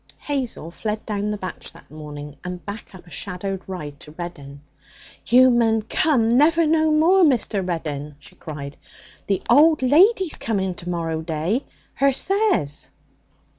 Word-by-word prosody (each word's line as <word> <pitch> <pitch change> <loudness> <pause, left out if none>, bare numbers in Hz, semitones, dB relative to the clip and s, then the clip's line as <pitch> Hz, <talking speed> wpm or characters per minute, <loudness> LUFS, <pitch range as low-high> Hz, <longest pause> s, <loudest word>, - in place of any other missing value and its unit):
Hazel 255 - -4
fled 215 +4 -4
down 210 -1 -2
the 210 - -2
batch 185 -2 -7
that 165 - -18
morning, 150 -1 -9
and 180 -1 -7
back 205 -1 -8
up 185 - -14
a 175 - -17
shadowed 190 +1 -5
ride 150 -7 -7
to - - -14
Reddin. 145 -5 -8 0.7
'You 255 +2 +6
munna 225 -2 +2
come 240 0 +2
never 305 +8 +4
no 315 0 +3
more, 330 +5 +4
Mr. 235 - +2
Reddin!' 150 -5 -4
she 145 - -17
cried. 145 -2 -8 0.5
'The 195 -2 0
old 305 -1 +5
lady's 360 - +4
coming 190 -4 -1
to 175 0 -8
morrow 165 -2 -2
day, 165 - -2 0.3
her 275 0 +2
says.' 380 - 0
200 Hz, 150 wpm, -22 LUFS, 165-275 Hz, 0.7 s, You